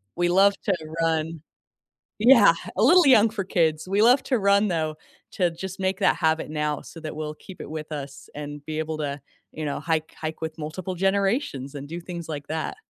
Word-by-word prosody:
we 175 0 +1
love 195 +3 +5
to 195 - +1 0.3
run 160 -1 0 0.8
Yeah, 230 -5 +8 0.2
a - - +2
little 345 +5 +6
young 225 -4 +6
for 205 -4 -4
kids. 160 -2 +1
We 200 +2 +1
love 245 +4 +5
to 255 - +1
run 200 +1 +3
though, 155 -3 -1 0.3
to 175 -3 +1
just 190 +3 -7
make 190 0 -1
that - - +3
habit 160 -1 +1
now, 150 -1 -2
so 165 - -11
that 155 -1 -6
we'll 155 -1 -4
keep 185 +4 -12
it - - -8
with 155 0 -6
us, 140 -2 -8
and 145 0 -7
be 155 0 -4
able 160 0 -3
to, 145 -2 -4 0.3
you 155 - -6
know, 145 -2 -2
hike 160 +1 -2
hike 155 0 -6
with 160 -1 -5
multiple 170 +4 -5
generations 195 - 0
and 140 0 -7
do 170 +3 -6
things 170 -1 -7
like 145 -2 -6
that. 160 0 -3
165 Hz, 205 wpm, -25 LUFS, 155-195 Hz, 0.8 s, Yeah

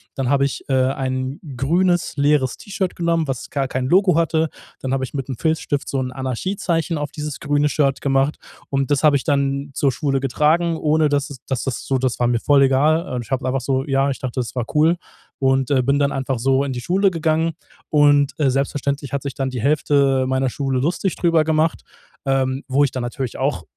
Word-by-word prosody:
Dann 135 -2 -1
habe 140 0 +3
ich, 140 - -4
äh, - - +1 0.2
ein 130 0 -3 0.2
grünes, 175 +5 +1
leeres 140 -3 +2
T-Shirt 195 -2 -3
genommen, 170 -2 0
was 135 -3 -4
gar 135 -2 -1
kein 130 0 -2
Logo 185 +1 +4
hatte. 160 -1 +1 0.3
Dann 130 0 -3
habe 135 - 0
ich 130 - -6
mit 135 -2 -3
dem 130 -4 -5
Filzstift 160 -3 -1
so 135 - -1
'n 125 -1 -3
Anarchiezeichen 165 - -2
auf 145 -1 -3
dieses 150 -2 -5
grüne 145 0 +1
Shirt 140 -1 +1
gemacht. 135 +1 +1 0.3
Und 135 +1 -1
das 145 - +2
habe 150 -2 +5
ich 140 - 0
dann 140 -1 0
zur 140 0 +1
Schule 135 0 -1
getragen, 155 +5 +1
ohne 155 -1 +2
dass 145 +1 -1
es 130 - -9
dass 130 -3 -2
das 135 -3 -4
so 135 - +1
das 130 -1 -1
war 120 - +2
mir 120 -1 +1
voll 140 +3 +4
egal. 140 +1 +2
Ich 115 - -17
habe 130 0 0
einfach 130 0 0
so 130 +1 0
ja, 135 0 +2
ich - - -5
dachte, 130 0 -4
das 125 0 -4
war 120 - -1
cool. 160 +3 +4 0.4
Und, 135 0 +1
äh, 130 -2 +4
bin 140 +3 +1
dann 140 -1 +1
einfach 135 -1 -2
so 135 +3 +2
in 135 -2 -3
die 125 - -5
Schule 190 +5 +2
gegangen. 165 -1 0 0.4
Und, 145 -2 +4
äh, 140 -3 +3
selbstverständlich 140 +1 -2
hat 140 -1 -2
sich 140 -2 -4
dann 135 -1 -2
die 125 -3 -4
Hälfte 140 -2 +2
meiner 130 0 +1
Schule 135 -1 -1
lustig 175 +6 -1
drüber 165 -3 +3
gemacht, 160 +1 +1 0.5
ähm, 135 0 0
wo 140 +2 +3
ich 140 - +1
dann 130 - -4
natürlich 120 0 -4
auch, - - -1
140 Hz, 215 wpm, -21 LUFS, 130-155 Hz, 0.5 s, habe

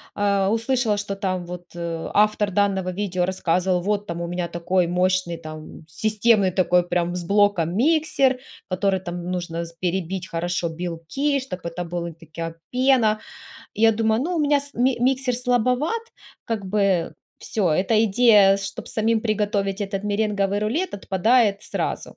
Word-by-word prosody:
а, 200 -1 +1
услышала, 230 -1 +1
что 200 -1 -3
там 185 -2 -2
вот, 175 0 -8
э, 170 -1 -4
автор 210 -1 +3
данного 195 -1 +1
видео 185 -2 -1
рассказывал: 180 0 0
"Вот 205 +2 -1
там 170 0 -4
у 170 - -3
меня 175 0 -3
такой 175 +1 0
мощный 180 -1 0
там 155 0 -10
системный 215 +2 +2
такой 180 -1 +2
прям 175 0 0
с 180 - -3
блоком 200 -3 +2
миксер, 280 0 +2 0.3
который 190 +1 +1
там 175 -1 -6
нужно 170 -2 -3
с 170 - -11
перебить 185 +1 -3
хорошо 175 0 -2
белки, 175 - -2
чтобы 220 -10 -7
это 175 +1 -5
была 170 0 -4
такая 165 +1 -7
пена". 250 -4 +3 0.6
Я 225 +1 +4
думаю: 220 +1 +1
"Ну, 350 +3 -2
у - - +1
меня 290 -1 +3
с 285 0 -8
ми 250 +1 +1
миксер 255 0 +1
слабоват, 250 - +1 0.4
как 220 -4 -3
бы 195 -3 +1 0.2
всё, 195 -6 -1
эта 205 +7 +2
идея, 205 -3 +5
чтобы 195 0 -6
самим 220 0 +1
приготовить 205 -2 -1
этот 195 0 -3
меренговый 205 -1 0
рулет, 250 - -1
отпадает 200 +2 +2
сразу". - - -4
195 Hz, 155 wpm, -23 LUFS, 175-225 Hz, 0.6 s, идея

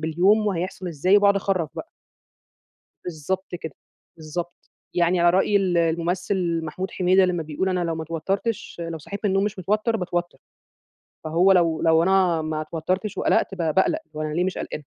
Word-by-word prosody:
باليوم 185 +7 +2
وهيحصل 185 -1 -3
إزاي 175 +5 +3
وباقعد 200 -1 +4
اخرّف 185 -5 0
بقى. 330 - -7 1.1
بالضبط 180 +3 -4
كده، 160 -4 -7 0.4
بالضبط. 170 +2 -5 0.4
يعني 175 +1 +2
على 175 0 +5
رأي 190 +3 +2
ال 185 -3 +2
الممثل 170 +1 0
محمود 185 +5 -5
حميدة 185 +1 +3
لما 175 -3 -1
بيقول: 155 +5 -2
"أنا 185 -1 0
لو 165 -1 -2
ما 160 - -4
اتوتّرتش 190 +8 -3
لو 165 - -5
صحيت 200 +6 -7
من 205 - +2
النوم 195 +1 +2
مش 210 -1 -3
متوتر 210 +5 0
باتوتّر." 175 -2 -3 0.9
فهو 170 +5 +4
لو 170 -3 +2
لو 160 0 +4
أنا 180 -3 +3
ما 155 0 -3
اتوتّرتش 180 +6 -3
وقلقْت - - +1
ب 190 - -15
باقلق، 180 - +1 0.2
هو 155 - -3
أنا 155 0 -3
ليه 175 - +1
مش 185 - -2
قلقانة؟ 150 - -6
175 Hz, 170 wpm, -23 LUFS, 165-190 Hz, 1.1 s, على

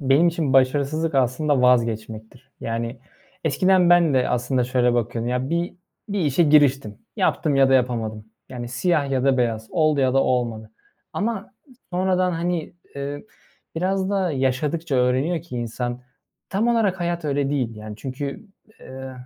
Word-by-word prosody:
Benim 140 +5 +4
için 160 -5 -1
başarısızlık 140 +4 +2
aslında 135 +1 +1
vazgeçmektir. 115 0 0
Yani, 115 +2 -4 0.5
eskiden 180 +3 +3
ben 170 -4 +5
de 130 - +2
aslında 125 +1 0
şöyle 125 -1 +1
bakıyordum. 120 0 -1
Ya 125 +3 -2
bir 170 +2 -1 0.3
bir 200 -1 -2
işe 150 0 +2
giriştim. 140 -8 +3 0.2
Yaptım 150 -3 +1
ya 135 -1 +5
da 135 - +4
yapamadım. 115 -4 0 0.2
Yani, 120 -2 -6
siyah 140 +2 0
ya 130 -1 0
da 135 -1 +3
beyaz. 115 -2 -1
Oldu 155 -4 +2
ya 130 -1 +2
da 135 - +4
olmadı 115 -4 -1 0.4
ama 215 0 -3 0.4
sonradan, 185 0 +1
hani, 170 -1 -2 0.2
eee, 140 +3 -5 0.5
biraz 190 +3 -1
da 190 -4 0
yaşadıkça 140 +4 -1
öğreniyor 130 +7 +1
ki 155 -8 -8
insan, 120 +1 -4 0.5
tam 215 +5 0
olarak 210 -6 +1
hayat 170 -1 -2
öyle 140 -1 0
değil 125 -6 -2
yani. 105 0 -8
Çünkü, 140 - -6 0.3
eee, 130 0 -9
135 Hz, 150 wpm, -23 LUFS, 125-170 Hz, 0.5 s, ben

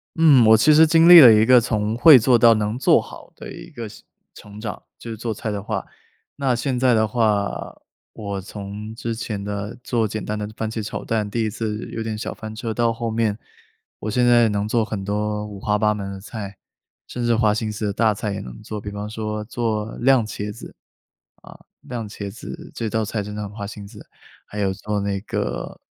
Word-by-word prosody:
嗯， 150 -7 +6
我 110 0 +7
其 135 +8 +5
实 160 +2 +7
经 165 +1 +5
历 175 -1 +12
了 125 -5 +10
一 110 0 +5
个 125 0 +6
从 110 -1 -1
会 150 +3 +9
做 125 +1 +4
到 115 0 +6
能 105 +1 -2
做 - - +4
好 - - -11
的 - - -10
一 170 0 -11
个 120 -8 -7
是 105 - -14 0.3
成 105 0 -12
长， 110 0 -6 0.2
就 115 - -8
是 - - -5
做 115 +1 -3
菜 110 +1 -4
的 100 -1 -3
话。 105 - -4 0.5
那 135 -3 0
现 125 +1 -2
在 125 -1 +4
的 110 -1 +2
话， 105 -3 -1 0.4
我 100 -2 -5
从 105 +2 -8
之 115 0 -4
前 110 -3 -4
的， 105 +3 -5
做 115 -3 0
简 110 +1 -5
单 105 - -3
的 105 0 -4
番 110 - -2
茄 110 0 -4
炒 105 - -6
蛋， 110 -2 -1
第 115 +2 -1
1 110 - 0
次 110 -1 -4
有 115 - -4
点 110 -1 -4
小 110 - -5
翻 110 0 -8
车， 110 0 -4
到 115 +1 +1
后 115 0 -4
面， 110 -2 0 0.6
我 110 - -4
现 125 +2 +2
在 120 -2 +5
能 105 0 -1
做 115 +1 +1
很 105 -3 -5
多 105 +1 -2
五 105 -2 -9
花 105 +1 0
八 105 0 +2
门 100 -2 -5
的 95 - -8
菜， 100 -1 -8 0.5
甚 120 - -5
至 120 -1 +3
花 110 -2 +3
心 110 0 -2
思 105 +1 -4
的 100 - -1
大 110 +1 +2
菜 105 0 -4
也 100 - -4
能 - - -9
做， 105 -1 -6
比 105 - -6
方 105 +1 -6
说 110 -1 -4
做 110 -2 -2
酿 130 -2 +4
茄 105 -1 -5
子。 110 - -11 0.7
啊， - - -14 0.2
酿 120 -3 -6
茄 100 -1 -7
子， 165 - -9
这 115 -2 -3
道 110 +1 0
菜 105 0 -3
真 105 +1 -7
的 105 - -4
很 100 - -6
花 105 -1 -7
心 100 0 -9
思， - - -13 0.4
还 105 - -9
有 95 -2 0
做 105 +2 -3
那 100 0 -2
个 - - -4
110 Hz, 245 characters per minute, -22 LUFS, 105-115 Hz, 0.7 s, 历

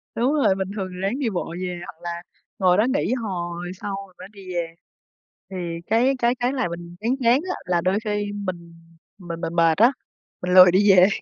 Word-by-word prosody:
Đúng 250 +5 +1
rồi, 280 -10 +3
bình 190 -1 -3
thường 195 -3 -3
thì - - -8
ráng 200 +8 -1
đi 260 -5 0
bộ 175 -4 -4
về, 180 -1 -4
hoặc 165 - -12
là 170 0 -4 0.4
ngồi 185 -2 +4
đó 215 - +4
nghỉ, 280 - 0
hồi 175 -7 -4
sau 200 -1 -3
mình 185 - -24
mới - - -9
đi 195 -3 -10
về. 165 -1 -3 0.7
Thì 190 - -6 0.3
cái 240 +5 +3
cái 240 +1 +2
cái 250 +1 -1
làm 255 -10 -1
mình 170 0 -8
chán 235 +4 0
chán, 240 +3 +5
á, - - -1
là 175 -1 +1
đôi 185 +4 +1
khi 210 -1 -1 0.2
mình 170 -2 -6 0.4
mình 170 -3 -7
mình 165 - -3
mệt 165 -2 +4
á, 235 +5 +6 0.5
mình 180 0 -1
lười 185 -1 +9
đi 200 +3 +5
về, 185 -1 +7
190 Hz, 220 wpm, -23 LUFS, 175-225 Hz, 0.7 s, lười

